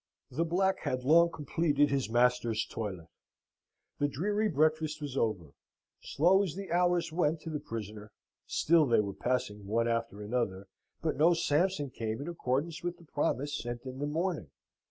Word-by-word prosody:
The 165 - 0
black 190 +3 +1
had 130 0 -2
long 170 +5 +6
completed 145 -2 +1
his 135 -4 0
master's 120 -1 +2
toilet: 95 -7 -5 0.9
the 145 - +2
dreary 205 +10 0
breakfast 155 0 +1
was 145 -3 -5
over: 95 - -1 0.5
slow 180 +6 +3
as 185 -6 -2
the 195 -2 -6
hours 175 -1 +2
went 160 -1 +1
to 165 - -6
the 150 - -2
prisoner, 105 -5 -7 0.4
still 160 -2 +3
they 115 - +4
were 100 -2 -1
passing 105 -5 -2
one 115 +3 +1
after 115 -3 -2
another, 105 -4 -2 0.4
but 160 -4 0
no 165 +4 +5
Sampson 155 -2 +1
came 110 -1 -3
in 145 - -5
accordance 155 0 -2
with 175 0 -3
the 170 - -17
promise 145 -1 -1
sent 120 0 -5
in 130 0 -7
the 145 - -1
morning. 165 - -2
145 Hz, 165 wpm, -31 LUFS, 115-165 Hz, 0.9 s, long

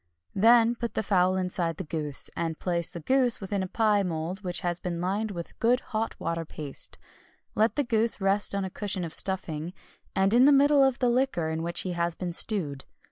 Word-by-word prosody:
Then 230 +3 +5
put 235 -1 -5
the - - 0
fowl 185 -2 +2
inside 180 -3 -1
the - - -4
goose, 150 -3 -3
and 165 -1 -2
place 170 -2 -1
the 175 -2 -8
goose 255 - +2
within 195 0 -3
a 190 - -2
pie 210 0 +2
mould 175 +1 -3
which 180 -3 -2
has 175 -1 -2
been 175 -2 -4
lined 200 +5 -1
with 170 -4 -8
good 245 +2 +3
hot 225 -2 -4
water 165 0 -2
paste. 150 -3 -3 0.6
Let 220 +2 +2
the 290 - +1
goose 230 -2 +1
rest 195 +1 +2
on 200 -1 -1
a 190 - -6
cushion 200 -2 -3
of 165 - -6
stuffing, 175 -3 -1 0.4
and 195 +2 +3
in 245 +2 +6
the 290 - +7
middle 285 0 +5
of 265 -2 +2
the 250 - +1
liquor 245 -10 0
in 160 0 -2
which 170 +1 -1
he 185 - -3
has 170 -1 -1
been 180 -2 -4
stewed. 160 -9 -1
190 Hz, 210 wpm, -27 LUFS, 170-225 Hz, 0.6 s, the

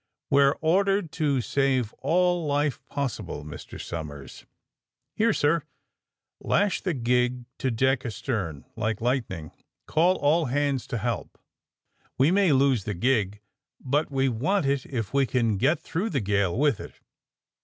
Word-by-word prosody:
We 140 - +5
are 140 0 +4
ordered 195 +1 +2
to 145 -6 0
save 130 -3 0
all 175 +2 +2
life 145 -1 0
possible. 105 - -4
Mr. 75 - -9
Som 80 -3 -5
ers! 70 -2 -11 0.3
" - - -61
Here, 225 +1 +3
sir!'^ 160 -3 +2 0.8
Lash 205 -1 +1
the 185 -5 -1
gig 125 0 +1
to 130 - 0
deck 130 +2 +1
astern 100 - -3
— - - -42
^like 110 -1 -1
lightning. 115 - -2 0.3
Call 175 +4 +3
all 155 +2 +2
hands 140 0 0
to 120 - -3
help. 115 +1 -3 0.8
We 140 +5 +4
may 195 -3 +4
lose 135 -6 +3
the 105 - -3
gig, 105 -1 0 0.4
but 145 +4 0
we 135 -1 +1
want 145 - 0
it 135 -1 0
if 115 -5 -4
we 140 -1 +3
can 115 -5 +1
get 145 - +2
through 180 +6 -3
the 145 - 0
gale 100 -3 0
with 145 -4 +2
it. - - -9
135 Hz, 155 wpm, -26 LUFS, 115-150 Hz, 0.8 s, We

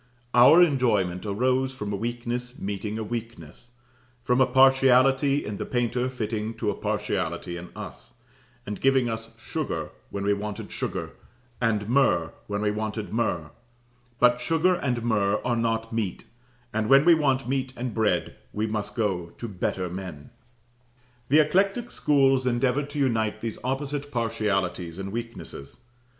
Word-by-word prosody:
Our 140 +9 +8
enjoyment 110 - +1
arose 130 +5 +1
from 105 -4 -4
a - - 0
weakness 120 +3 -4
meeting 105 +2 -3
a 110 - -3
weakness, 115 -2 -7 0.5
from 125 +1 +2
a 130 - +5
partiality 135 +2 +4
in 105 -1 -4
the - - -4
painter 125 +1 0
fitting 110 -2 -3
to 110 -2 -1
a - - -3
partiality 90 -2 -2
in 85 0 -8
us, - - -9 0.5
and 105 0 -5
giving 135 -2 +3
us 115 0 -4
sugar 115 - -4 0.2
when 100 - -4
we 100 +1 +3
wanted 105 +1 -5
sugar, - - -4 0.5
and 105 -3 +1
myrrh 115 -10 +3 0.2
when 105 0 -2
we 105 - +2
wanted 110 0 -4
myrrh; 85 -9 -1 0.7
but 125 0 +4
sugar 165 +7 +2
and 125 -8 -1
myrrh 105 -3 +1
are 120 -1 +1
not 115 -1 -1
meat: 110 -5 -2 0.5
and 110 0 -1
when 135 +2 +7
we 170 - +8
want 135 -5 +1
meat 130 0 -1
and 125 -1 -3
bread, 110 -2 0 0.2
we 105 +1 -1
must 105 -2 -3
go 95 -7 -1
to 120 - -5
better 95 -2 -2
men. 90 -5 -7 1.0
The 150 +3 +7
eclectic 195 +9 +1
schools 135 -3 +3
endeavoured 125 +3 +1
to 145 - -7
unite 115 -6 0
these 115 -2 -4
opposite 140 +2 -3
partialities 95 -7 -1
and 95 0 -5
weaknesses. 115 -11 -7
115 Hz, 150 wpm, -26 LUFS, 105-130 Hz, 1.0 s, Our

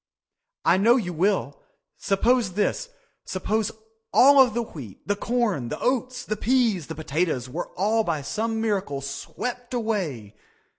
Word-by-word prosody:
I - - +5
know 225 +5 +5
you 185 -9 -1
will. 200 - 0 0.3
Suppose 220 0 +1
this—suppose 220 - -2 0.4
all 275 +1 +7
of 245 -4 +3
the 235 - +1
wheat, 130 - -11
the 205 - +1
corn, 210 - -1
the - - -4
oats, 250 -1 -1
the 215 - -2
peas, 225 - +1
the 160 - -6
potatoes, 155 -4 -1
were 160 +8 -4
all 220 +4 +2
by 160 -7 -2
some 225 +9 -2
miracle 195 -11 -1
swept 240 - -5
away. 170 - -2
210 Hz, 140 wpm, -25 LUFS, 165-240 Hz, 0.4 s, all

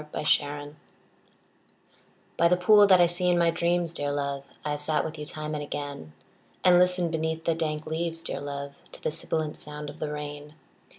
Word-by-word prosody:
THE 150 - -12 0.2
POOL 145 0 +1 1.6
By 170 - +4
the 180 +1 +3
pool 205 +3 +7
that 185 -2 +7
I 175 - +7
see 175 +1 0
in 175 - +3
my 170 -1 +4
dreams, 170 0 0
dear 145 -3 -2
love, 140 -1 -2 0.2
I 150 - -1
have 145 0 -3
sat 150 +1 +1
with 160 -1 -6
you 150 - -6
time 155 0 -5
and 150 - -2
again; 145 - -6 0.5
And 180 -1 +7
listened 180 -2 +3
beneath 160 0 -2
the 165 - +3
dank 155 -2 -2
leaves, 165 +1 -3
dear 140 - -4
love, 140 0 -5 0.2
To - - -9
the - - 0
sibilant 155 -1 -3
sound 150 0 -7
of - - -16
the 150 -1 -3
rain. 150 0 -6
155 Hz, 195 wpm, -27 LUFS, 145-170 Hz, 1.6 s, pool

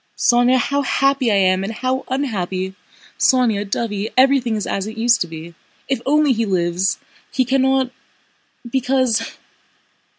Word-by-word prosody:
"Sónya, 245 +1 +3
how 280 +3 0
happy 275 -2 +1
I - - +2
am, 185 -1 +2
and 200 - -3
how 255 +3 -2
unhappy!... 190 -8 -3 0.5
Sónya, 225 -4 +2
dovey, 210 0 -2
everything 260 -3 +3
is 210 - -3
as 195 +1 -3
it 220 +1 -8
used 235 +1 +3
to 175 - 0
be. 165 +1 -9 0.3
If 270 -3 -1
only 295 -1 +3
he 230 0 -1
lives! 185 -1 0 0.3
He 255 - +1
cannot... 265 0 +1 0.8
because... 250 -2 0
235 Hz, 140 wpm, -19 LUFS, 200-260 Hz, 0.8 s, Sónya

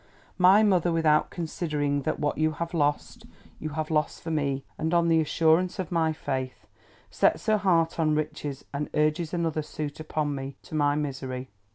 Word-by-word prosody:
My 190 +4 +7
mother: 180 -4 +3
without 155 -2 +3
considering 150 -4 -2
that - - -2
what 145 +1 -1
you 155 0 +2
have 170 +2 -5
lost, 145 -3 -1 0.3
you 155 - -4
have 155 0 -2
lost 150 -1 0
for 165 - -4
me, 140 -3 -1
and 160 +2 -1
on 170 0 +3
the 165 -1 +4
assurance 165 +4 +2
of 185 -3 -4
my 165 -2 +2
faith: 130 -4 -4 0.5
sets - - +2
her 215 0 +3
heart 170 -4 +2
on 155 -2 +2
riches, 150 -2 -4
and 145 +1 -3
urges 155 +2 +1
another 165 -3 -1
suit 150 -1 -6
upon 155 -2 -2
me, 135 0 -5
to - - -14
my 145 -1 +2
misery. 130 -3 -4
155 Hz, 180 wpm, -27 LUFS, 145-165 Hz, 0.5 s, My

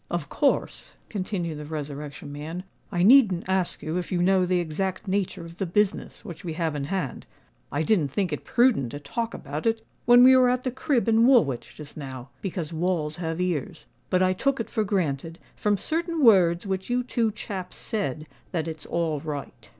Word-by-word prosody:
"Of 170 -4 -3
course," 285 - 0
continued 185 -6 -3
the 150 - -6
Resurrection 145 -2 -6
Man, 155 +5 -6 0.3
"I 175 0 +1
needn't 210 -6 +6
ask 190 -2 -1
you 160 +3 -2
if 175 - -6
you 180 - +1
know 185 0 +3
the 180 0 +2
exact 185 +4 -3
nature 190 -3 -1
of 170 +1 -12
the 195 - -1
business 205 +3 0
which 170 +1 -8
we 170 -3 -4
have 160 -2 -1
in 140 -1 -2
hand. 180 -6 -3 0.4
I 145 +3 0
didn't 170 -4 +2
think 175 +4 -1
it 150 - -4
prudent 240 - +3
to 145 - -5
talk 230 +11 -3
about 150 +8 -4
it 225 0 0 0.2
when 245 0 +8
we 260 +1 +8
were 255 -1 +5
at 250 0 0
the 255 - -1
crib 260 -2 0
in 225 +1 +5
Woolwich 180 - +3
just 150 0 -10
now, 130 -3 -7
because 175 -4 -4
walls 160 -2 -1
have 165 -1 -3
ears; 175 -11 -2 0.2
but 185 0 +3
I 185 0 +3
took 270 +8 0
it 230 - -4
for 220 - +1
granted, 165 -5 -1 0.2
from 210 -1 +1
certain 330 - -1
words 180 -7 +5
which 190 +1 -3
you 250 +1 +1
two 235 -3 0
chaps 190 -4 -6
said, 155 - -3 0.3
that 165 -2 -1
it's 160 -2 -7
all 165 -3 -1
right." 140 -5 -7
180 Hz, 195 wpm, -26 LUFS, 155-215 Hz, 0.4 s, when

